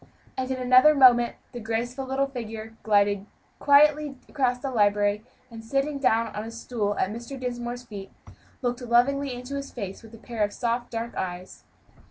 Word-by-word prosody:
And 260 0 -3
in 260 - -1
another 255 +4 +6
moment 240 -3 +6 0.2
a 240 - -5
graceful 240 +4 -3
little 270 +1 +1
figure 225 -4 -7
glided 205 -1 +2 0.3
quietly 290 0 +4
across 255 -4 0
the 270 +1 -4
library, 205 -2 +2 0.3
and 225 -1 -9
sitting 275 +4 -1
down 230 -4 +1
on 210 - -3
a 225 - -7
stool 230 -3 -3
at 190 - 0
Mr. 240 +4 -7
Dinsmore's 245 -1 -4
feet, 200 -5 -9 0.5
looked 245 0 -1
lovingly 255 +4 +2
into 250 +2 -7
his 280 0 -5
face 195 -5 -6
with 225 0 -13
a - - -12
pair 225 -1 -3
of 205 0 -1
soft, 240 0 -2
dark 230 0 -4
eyes. 180 0 -6
240 Hz, 175 wpm, -26 LUFS, 220-260 Hz, 0.5 s, another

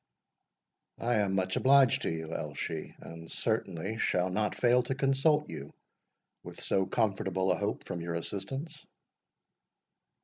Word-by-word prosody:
"I 120 0 +1
am 100 -2 +1
much 95 -1 0
obliged 135 -1 +5
to - - -1
you, 80 -1 -4
Elshie, 80 +1 -4
and 80 0 -10
certainly 100 +7 -2
shall 90 -3 +1
not 105 +2 0
fail 125 0 +4
to 130 +2 -3
consult 140 +3 +2
you, 70 - -8 0.7
with - - -10
so 95 -1 +1
comfortable 95 -3 +1
a - - +3
hope - - -2
from 85 - -5
your 85 0 -3
assistance." 135 - -4
100 Hz, 135 wpm, -31 LUFS, 85-130 Hz, 0.7 s, obliged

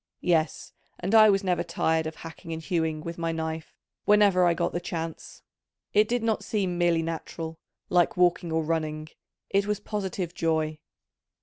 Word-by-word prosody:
Yes, 165 -2 0 0.3
and 190 +4 -2
I 215 -1 +8
was 195 0 +3
never 180 -3 +1
tired 160 0 0
of 160 - -6
hacking 165 +1 -9
and 160 - -3
hewing 160 -2 -1
with 170 +1 -6
my 165 0 0
knife 160 0 -4 0.3
whenever 205 -3 +5
I 170 - +3
got 170 0 0
the 175 - 0
chance: 165 -2 -6 0.5
it 210 +1 +5
did 240 0 0
not 225 -1 0
seem 190 -5 -1
merely 170 -1 +2
natural, 165 0 -5 0.3
like 175 0 +2
walking 175 -1 +2
or 160 0 +1
running, 155 -1 -2 0.4
it 200 +1 +2
was 210 -1 0
positive 190 -4 -3
joy. 155 -2 0
170 Hz, 170 wpm, -27 LUFS, 160-190 Hz, 0.5 s, I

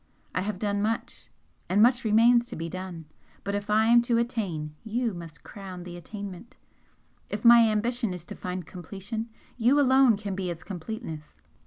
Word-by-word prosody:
I 180 - 0
have 205 0 -3
done 205 0 -1
much 225 +2 -3 0.4
and 195 - +2
much 245 +3 +5
remains 235 +2 +5
to 240 - -6
be 165 +1 -4
done 185 -2 -7 0.4
but 200 - -3
if 205 0 -3
I 215 +1 +4
am 235 +1 +6
to 235 0 +1
attain, 195 -11 -2
you 230 0 -1
must 170 -3 -10
crown 190 -3 -9
the 175 -1 -8
attainment 200 +3 -8 0.7
if - - -5
my 235 -1 +8
ambition 230 +1 0
is 180 -2 -6
to - - -8
find 180 -1 -5
completion, 200 +6 -6 0.3
you 250 +5 +4
alone 260 -4 +5
can 200 -1 -4
be 185 -1 -3
its 170 -1 -6
completeness. 180 -4 -7
210 Hz, 175 wpm, -27 LUFS, 180-235 Hz, 0.7 s, my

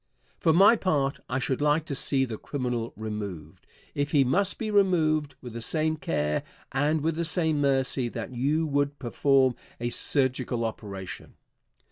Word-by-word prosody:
For 160 - +3
my 195 +8 +7
part, 145 -10 0
I 125 - 0
should 135 +1 -1
like 150 +1 +2
to 155 - -4
see 135 0 +1
the 115 -4 -6
criminal 125 -4 -3
removed, 100 -8 -6 0.3
if 145 +2 -2
he 140 -3 +5
must 185 +10 +1
be 220 -2 -3
removed, 160 -7 +2
with 125 -3 -8
the 115 - -5
same 155 +6 +1
care 75 - -1 0.3
and 145 +3 +1
with 160 +1 0
the 170 - -1
same 160 -3 +2
mercy 135 -2 +1
that 130 - -6
you 145 +6 +1
would 145 -1 0
perform 135 +1 +2 0.3
a 120 0 -2
surgical 130 -2 0
operation. 100 -4 -7
140 Hz, 160 wpm, -27 LUFS, 120-155 Hz, 0.3 s, my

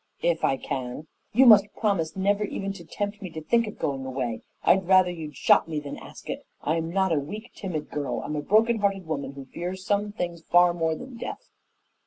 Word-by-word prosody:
"If 170 -1 +1
I 135 - +3
can." 130 +3 -4 0.3
"You 255 +5 +6
must 205 -3 +7
promise 195 -8 0
never 200 +2 +1
even 195 -1 -3
to 175 - -10
tempt 205 +5 -4
me 185 - -5
to 160 - -5
think 230 +5 +2
of 210 - -7
going 135 -2 -2
away. 130 -4 -3 0.2
I'd 190 0 +4
rather 185 -1 +5
you'd 155 -4 -7
shot - - +4
me 155 -2 -1
than 145 -1 -6
ask - - -12
it. - - -4 0.2
I'm 165 +1 0
not 190 +1 +1
a 155 - +3
weak, 210 - -7
timid 170 -7 -5
girl. 145 -2 -2
I'm 150 - -3
a 150 - -1
broken 220 +7 +3
hearted 195 -2 0
woman 140 -3 -3
who 135 -1 -9
fears 180 +6 -6
some 205 +1 +1
things 175 -4 -4
far 175 +1 +5
more 165 -2 0
than 255 +6 -9
death." - - -7
175 Hz, 215 wpm, -26 LUFS, 155-205 Hz, 0.3 s, must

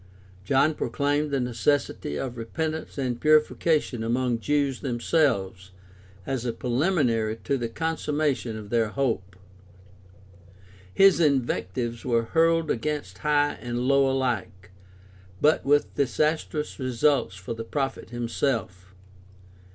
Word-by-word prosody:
John 140 +8 +3
proclaimed 145 0 -1
the 140 -1 0
necessity 125 - -1
of 130 -2 -4
repentance 155 +9 -4
and 125 -3 -2
purification 155 -4 +2
among 120 +1 0
Jews 140 0 0
themselves 115 - 0 0.5
as 130 -3 -2
a 120 - -1
preliminary 120 - 0
to 140 - 0
the 120 -3 -3
consummation 150 -5 -1
of 105 -1 -9
their 115 -2 +2
hope. 110 -6 -2 1.6
His 195 - +5
invectives 125 -5 0
were 115 -2 +1
hurled 165 -1 +3
against 120 -8 -3
high 145 +3 +1
and 120 0 -3
low 140 0 +4
alike, 110 -9 -2 0.7
but 155 +2 +3
with 145 +1 +2
disastrous 150 +2 -1
results 130 -4 +1
for 95 +5 -6
the 115 0 -6
prophet 135 +1 -3
himself. 115 -6 -3
130 Hz, 110 wpm, -26 LUFS, 115-150 Hz, 1.6 s, His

